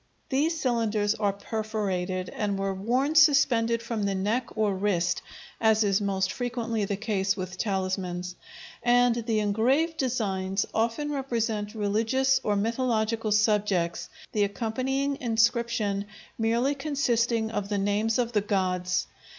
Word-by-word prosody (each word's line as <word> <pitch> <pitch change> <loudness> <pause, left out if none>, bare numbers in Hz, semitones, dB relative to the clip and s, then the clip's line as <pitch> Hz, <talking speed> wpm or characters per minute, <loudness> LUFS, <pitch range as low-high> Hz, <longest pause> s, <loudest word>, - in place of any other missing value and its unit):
These 315 +4 +1
cylinders 220 -5 +1
are 210 -2 0
perforated 200 -3 -3
and 205 -2 -2
were 195 0 -1
worn 245 +10 0
suspended 245 -7 +4
from 230 -2 -3
the 200 -1 0
neck 210 +7 -2
or 215 -2 +2
wrist, 180 -3 0 0.4
as 220 -1 +4
is 200 0 +2
most 190 -2 0
frequently 235 -2 -2
the 195 0 -2
case 200 -2 0
with 185 -1 -5
talismans, 185 -3 -2 0.5
and 245 0 +4
the 230 -1 -1
engraved 255 +11 +1
designs 195 -7 -1
often 235 +7 0
represent 230 -6 -2
religious 225 +6 +2
or 210 - +1
mythological 225 0 0
subjects, 205 -5 +1 0.2
the 210 - +1
accompanying 260 +7 -1
inscription 230 -3 +1 0.3
merely 235 +5 +1
consisting 240 -6 0
of 205 -2 -3
the 205 - 0
names 205 +3 +1
of 240 -2 0
the 210 -3 +2
gods. 185 -3 0
220 Hz, 130 wpm, -27 LUFS, 200-240 Hz, 0.5 s, suspended